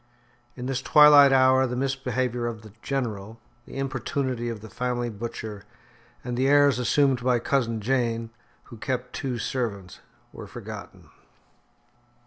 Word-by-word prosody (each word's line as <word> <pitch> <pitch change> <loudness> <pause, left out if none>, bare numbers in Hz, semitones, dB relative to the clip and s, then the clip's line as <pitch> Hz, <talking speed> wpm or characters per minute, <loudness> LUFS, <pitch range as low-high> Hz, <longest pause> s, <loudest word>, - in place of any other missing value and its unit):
In 125 - -7
this 130 0 -2
twilight 145 -1 +7
hour 130 0 +4
the 125 - -4
misbehaviour 130 -2 -2
of 110 -2 -6
the 110 -2 -13
"General," 115 -5 -4 0.3
the - - -9
importunity 130 -2 -2
of 115 -3 -6
the 110 - -10
family 120 0 -2
butcher, 110 -1 -7 0.6
and 125 -1 -4
the 130 +2 +1
airs 145 -2 +4
assumed 135 0 +2
by 125 -1 +3
cousin 115 -2 0
Jane, 115 -1 -1 0.3
who 120 - -13
kept 125 +1 -4
two 130 -3 -3
servants, 105 -7 -4 0.3
were - - -9
forgotten. - - -10
125 Hz, 135 wpm, -25 LUFS, 115-135 Hz, 0.6 s, twilight